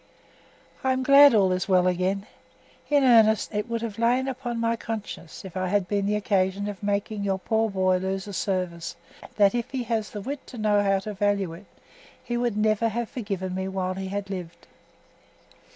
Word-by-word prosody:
I 260 Hz, 0 st, +2 dB
am 260 Hz, 0 st, -1 dB
glad 280 Hz, -1 st, +8 dB
all 195 Hz, -3 st, +4 dB
is 185 Hz, +2 st, -1 dB
well 180 Hz, -1 st, +4 dB
again. 185 Hz, +2 st, 0 dB, 0.6 s
In 290 Hz, -1 st, +4 dB
earnest, 225 Hz, -4 st, +4 dB
it 210 Hz, +3 st, -2 dB
would 230 Hz, 0 st, -2 dB
have 225 Hz, -2 st, -5 dB
lain 245 Hz, +3 st, +2 dB
upon 245 Hz, -3 st, -4 dB
my 230 Hz, 0 st, +1 dB
conscience 215 Hz, -7 st, -7 dB
if 190 Hz, -, -9 dB
I 185 Hz, 0 st, -1 dB
had 195 Hz, 0 st, +1 dB
been 200 Hz, 0 st, 0 dB
the 210 Hz, -, +1 dB
occasion 200 Hz, -1 st, 0 dB
of 205 Hz, -2 st, -6 dB
making 205 Hz, 0 st, -2 dB
your 195 Hz, -1 st, 0 dB
poor 220 Hz, +3 st, 0 dB
boy 185 Hz, -2 st, +2 dB
lose 190 Hz, +1 st, -3 dB
a 200 Hz, -, -7 dB
service, 180 Hz, -4 st, -2 dB, 0.4 s
that 200 Hz, -2 st, +4 dB
if 240 Hz, -1 st, -2 dB
he 260 Hz, -2 st, -3 dB
has 220 Hz, -3 st, -2 dB
the 210 Hz, -, -6 dB
wit 275 Hz, +6 st, -6 dB
to 250 Hz, -, -10 dB
know 210 Hz, -2 st, +2 dB
how 195 Hz, -1 st, +2 dB
to 210 Hz, +2 st, -5 dB
value 200 Hz, -3 st, 0 dB
it, 185 Hz, +5 st, -12 dB, 0.6 s
he 240 Hz, -, -3 dB
would 240 Hz, -3 st, -1 dB
never 215 Hz, +1 st, +2 dB
have 235 Hz, +1 st, -3 dB
forgiven 195 Hz, -6 st, -4 dB
me 190 Hz, 0 st, -3 dB
while 190 Hz, -1 st, -2 dB
he 190 Hz, 0 st, -5 dB
had 200 Hz, +1 st, -4 dB
lived. 175 Hz, -3 st, -7 dB
205 Hz, 200 wpm, -25 LUFS, 190-230 Hz, 0.6 s, glad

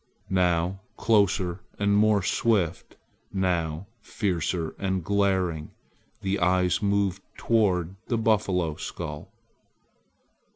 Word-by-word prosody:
Now 90 Hz, 0 st, +1 dB, 0.2 s
closer 100 Hz, -5 st, +2 dB, 0.2 s
and 100 Hz, 0 st, +2 dB
more 105 Hz, -2 st, +4 dB
swift, 95 Hz, -5 st, 0 dB, 0.3 s
now 85 Hz, -3 st, -1 dB, 0.2 s
fiercer 85 Hz, -6 st, -2 dB
and 95 Hz, -2 st, -1 dB
glaring, 95 Hz, -5 st, 0 dB, 0.5 s
the 100 Hz, +1 st, -1 dB
eyes 90 Hz, 0 st, +2 dB
moved 100 Hz, -2 st, +1 dB, 0.2 s
toward 95 Hz, -6 st, +1 dB
the 115 Hz, -, 0 dB
buffalo 95 Hz, -8 st, +1 dB
skull. -, -, -6 dB
95 Hz, 90 wpm, -26 LUFS, 90-100 Hz, 0.5 s, more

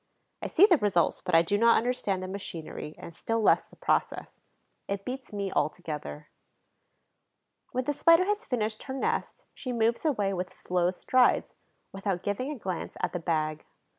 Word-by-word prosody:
I -, -, -3 dB
see 375 Hz, -, +6 dB
the 365 Hz, -5 st, +5 dB
results, 190 Hz, -5 st, +1 dB
but 180 Hz, -, +1 dB
I 165 Hz, -, +7 dB
do 205 Hz, +5 st, 0 dB
not 230 Hz, +1 st, +6 dB
understand 215 Hz, -6 st, -1 dB
the -, -, -4 dB
machinery 170 Hz, -5 st, -7 dB
and 170 Hz, -, -10 dB
still 225 Hz, +5 st, -1 dB
less 215 Hz, -, +4 dB
the -, -, -19 dB
process. -, -, -1 dB, 0.5 s
It 200 Hz, 0 st, -3 dB
beats 260 Hz, +1 st, -6 dB
me 200 Hz, -2 st, -3 dB
altogether. 150 Hz, -, -3 dB, 1.4 s
When 255 Hz, -, -1 dB
the 290 Hz, -, -1 dB
Spider 335 Hz, +4 st, +5 dB
has 415 Hz, +3 st, 0 dB
finished 220 Hz, -, -2 dB
her 265 Hz, -, -5 dB
nest, 270 Hz, -, -2 dB
she 255 Hz, -, -5 dB
moves 230 Hz, 0 st, +1 dB
away 210 Hz, -11 st, +1 dB
with 180 Hz, 0 st, -3 dB
slow 180 Hz, -1 st, 0 dB
strides, 250 Hz, +7 st, +2 dB, 0.4 s
without 195 Hz, -2 st, -2 dB
giving 205 Hz, +7 st, -2 dB
a 300 Hz, -, -4 dB
glance 185 Hz, -6 st, -5 dB
at -, -, -1 dB
the 175 Hz, -, -2 dB
bag. 155 Hz, -2 st, -1 dB
205 Hz, 170 wpm, -28 LUFS, 180-250 Hz, 1.4 s, I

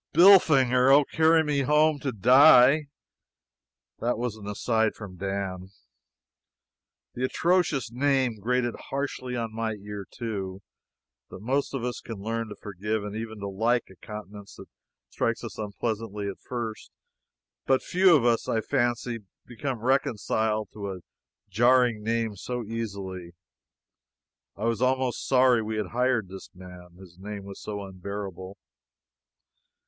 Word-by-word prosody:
"Billfinger! 135 Hz, -9 st, +6 dB
Oh, 140 Hz, +1 st, +6 dB
carry 160 Hz, +2 st, +3 dB
me 150 Hz, -2 st, 0 dB
home 150 Hz, +2 st, +3 dB
to 140 Hz, -1 st, -2 dB
die!" 130 Hz, +5 st, +6 dB, 1.1 s
That 120 Hz, 0 st, 0 dB
was 120 Hz, -2 st, -3 dB
an 105 Hz, -2 st, -10 dB
"aside" 110 Hz, +2 st, 0 dB
from 100 Hz, -4 st, -10 dB
Dan. 95 Hz, -1 st, -4 dB, 1.4 s
The 125 Hz, -, -4 dB
atrocious 160 Hz, -3 st, +1 dB
name 130 Hz, -3 st, +1 dB
grated 120 Hz, +3 st, 0 dB, 0.2 s
harshly 135 Hz, -2 st, -3 dB
on 115 Hz, -2 st, -3 dB
my 110 Hz, 0 st, -2 dB
ear, 100 Hz, -1 st, -8 dB
too. 100 Hz, -5 st, -5 dB, 0.7 s
The -, -, -9 dB
most 135 Hz, +8 st, -1 dB
of 130 Hz, -, -3 dB
us 125 Hz, 0 st, -3 dB
can 115 Hz, -, -7 dB
learn 115 Hz, +2 st, -3 dB
to 105 Hz, -, -8 dB
forgive, 105 Hz, +2 st, -4 dB
and 105 Hz, 0 st, -6 dB
even 110 Hz, -1 st, -6 dB
to 100 Hz, -, -3 dB
like, 115 Hz, +3 st, 0 dB
a -, -, -15 dB
countenance 105 Hz, 0 st, -10 dB
that -, -, -11 dB, 0.5 s
strikes -, -, -1 dB
us -, -, -8 dB
unpleasantly 105 Hz, 0 st, -4 dB
at 100 Hz, -, -6 dB
first, 115 Hz, -3 st, -6 dB, 0.8 s
but 135 Hz, -1 st, +3 dB
few 185 Hz, -1 st, +5 dB
of 130 Hz, -6 st, +2 dB
us, 115 Hz, -1 st, +2 dB
I 115 Hz, -, +1 dB
fancy, 120 Hz, -1 st, -1 dB, 0.3 s
become 120 Hz, 0 st, -5 dB
reconciled 110 Hz, -4 st, 0 dB
to 100 Hz, -2 st, -5 dB
a 90 Hz, -, -10 dB, 0.5 s
jarring 120 Hz, +2 st, +3 dB
name 115 Hz, -1 st, -1 dB
so 125 Hz, +5 st, -4 dB
easily. 100 Hz, -6 st, -6 dB, 1.2 s
I 105 Hz, -, -6 dB
was 115 Hz, -1 st, 0 dB
almost 130 Hz, -1 st, 0 dB
sorry 125 Hz, -3 st, +4 dB
we 110 Hz, 0 st, -4 dB
had 105 Hz, -4 st, -2 dB
hired 125 Hz, -3 st, +1 dB
this 95 Hz, +1 st, -10 dB
man, 90 Hz, -1 st, -12 dB
his 90 Hz, -2 st, -15 dB
name 100 Hz, +1 st, -7 dB
was 100 Hz, 0 st, -10 dB
so 100 Hz, -1 st, -5 dB
unbearable. 95 Hz, 0 st, -7 dB
115 Hz, 140 wpm, -26 LUFS, 100-125 Hz, 1.4 s, Billfinger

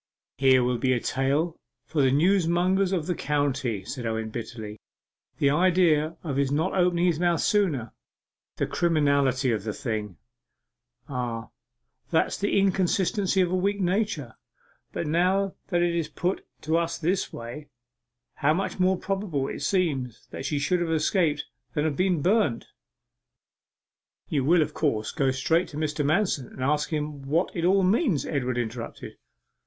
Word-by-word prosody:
'Here 130 Hz, -2 st, +5 dB
will 125 Hz, -1 st, 0 dB
be 130 Hz, 0 st, +2 dB
a 120 Hz, -, +1 dB
tale 140 Hz, +7 st, 0 dB, 0.3 s
for 150 Hz, -, 0 dB
the 135 Hz, -, +4 dB
newsmongers 180 Hz, +4 st, +2 dB
of 175 Hz, -5 st, 0 dB
the 180 Hz, -, 0 dB
county,' 135 Hz, -, -1 dB
said 130 Hz, +2 st, -5 dB
Owen 110 Hz, -1 st, -2 dB
bitterly. 110 Hz, -2 st, -7 dB, 0.6 s
'The 140 Hz, -, +3 dB
idea 165 Hz, -2 st, +3 dB
of 145 Hz, -5 st, -3 dB
his 140 Hz, -1 st, +1 dB
not 160 Hz, +6 st, 0 dB
opening 180 Hz, -2 st, +2 dB
his 170 Hz, -3 st, +2 dB
mouth 175 Hz, -1 st, +2 dB
sooner 155 Hz, -, +1 dB, 0.6 s
the -, -, 0 dB
criminality 140 Hz, -6 st, +2 dB
of 110 Hz, -4 st, -1 dB
the 105 Hz, -1 st, -3 dB
thing!' 110 Hz, -, -4 dB, 0.9 s
'Ah, 120 Hz, -4 st, -4 dB, 0.6 s
that's 160 Hz, -, +1 dB
the 205 Hz, -, 0 dB
inconsistency 195 Hz, 0 st, +2 dB
of 180 Hz, -1 st, +1 dB
a -, -, +1 dB
weak 200 Hz, +2 st, 0 dB
nature. 180 Hz, -, -1 dB, 0.6 s
But -, -, -3 dB
now 185 Hz, +5 st, +1 dB
that 175 Hz, -2 st, +1 dB
it 175 Hz, -1 st, +1 dB
is 165 Hz, -3 st, -1 dB
put 180 Hz, +5 st, -2 dB
to 160 Hz, +1 st, +1 dB
us 170 Hz, 0 st, -1 dB
in -, -, 0 dB
this 185 Hz, +2 st, 0 dB
way, 120 Hz, +6 st, -8 dB, 0.7 s
how 155 Hz, +1 st, +2 dB
much 195 Hz, +1 st, -3 dB
more 185 Hz, 0 st, +3 dB
probable 190 Hz, -10 st, -2 dB
it -, -, -5 dB
seems 145 Hz, -, -1 dB
that -, -, -6 dB
she 150 Hz, -, -1 dB
should 175 Hz, +5 st, +1 dB
have 170 Hz, -, -1 dB
escaped 160 Hz, -1 st, +1 dB, 0.3 s
than 150 Hz, 0 st, +1 dB
have 155 Hz, -3 st, 0 dB
been 180 Hz, -2 st, +1 dB
burnt 190 Hz, -, +2 dB, 0.8 s
' -, -, -50 dB
'You 140 Hz, -4 st, 0 dB
will, 165 Hz, +2 st, +5 dB
of -, -, -6 dB
course, 110 Hz, -8 st, -1 dB
go 135 Hz, -2 st, +1 dB
straight 160 Hz, +7 st, +1 dB
to 150 Hz, -, -9 dB
Mr. 150 Hz, -1 st, -1 dB
Manston, 155 Hz, -, +1 dB
and 130 Hz, -, -7 dB
ask 150 Hz, +2 st, +1 dB
him 150 Hz, -2 st, -3 dB
what 165 Hz, +6 st, 0 dB
it 170 Hz, -1 st, -1 dB
all 190 Hz, +2 st, +4 dB
means?' 195 Hz, -, +2 dB
Edward 130 Hz, -4 st, -1 dB
interrupted. 115 Hz, 0 st, -5 dB
155 Hz, 165 wpm, -26 LUFS, 135-180 Hz, 0.9 s, Here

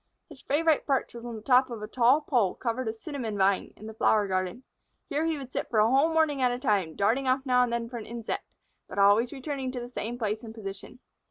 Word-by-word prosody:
His -, -, -13 dB
favorite 310 Hz, +2 st, +1 dB
perch 270 Hz, -3 st, 0 dB
was 235 Hz, 0 st, -9 dB
on 235 Hz, -, -6 dB
the 215 Hz, -, -9 dB
top 255 Hz, +1 st, +4 dB
of 230 Hz, -3 st, -6 dB
a -, -, -4 dB
tall 250 Hz, +6 st, +4 dB
pole 240 Hz, -10 st, +1 dB
covered 245 Hz, 0 st, -2 dB
with 220 Hz, -, -2 dB
cinnamon 235 Hz, -5 st, -5 dB
vine, 195 Hz, 0 st, +2 dB
in 215 Hz, -, -11 dB
the 220 Hz, -, -7 dB
flower 215 Hz, -1 st, +2 dB
garden. 185 Hz, +5 st, -2 dB, 0.5 s
Here 300 Hz, +3 st, 0 dB
he 320 Hz, -2 st, 0 dB
would 265 Hz, -2 st, -8 dB
sit -, -, -3 dB
for 225 Hz, -, -1 dB
a 215 Hz, +1 st, +5 dB
whole 280 Hz, +5 st, +4 dB
morning 315 Hz, -4 st, +2 dB
at 250 Hz, -, +4 dB
a 245 Hz, -, -2 dB
time, 205 Hz, -, 0 dB
darting 235 Hz, +7 st, +1 dB
off 260 Hz, +1 st, +1 dB
now 250 Hz, -1 st, +4 dB
and 245 Hz, -1 st, +1 dB
then 235 Hz, 0 st, -2 dB
for 240 Hz, +1 st, -7 dB
an 220 Hz, -, -8 dB
insect, 230 Hz, -1 st, -5 dB, 0.4 s
but -, -, -9 dB
always 205 Hz, +4 st, +4 dB
returning 270 Hz, -2 st, -4 dB
to 250 Hz, -, -3 dB
the 240 Hz, -, -6 dB
same 240 Hz, -1 st, -4 dB
place 215 Hz, -2 st, -2 dB
and 225 Hz, -2 st, -10 dB
position. 200 Hz, +3 st, -8 dB
240 Hz, 250 wpm, -28 LUFS, 215-265 Hz, 0.5 s, a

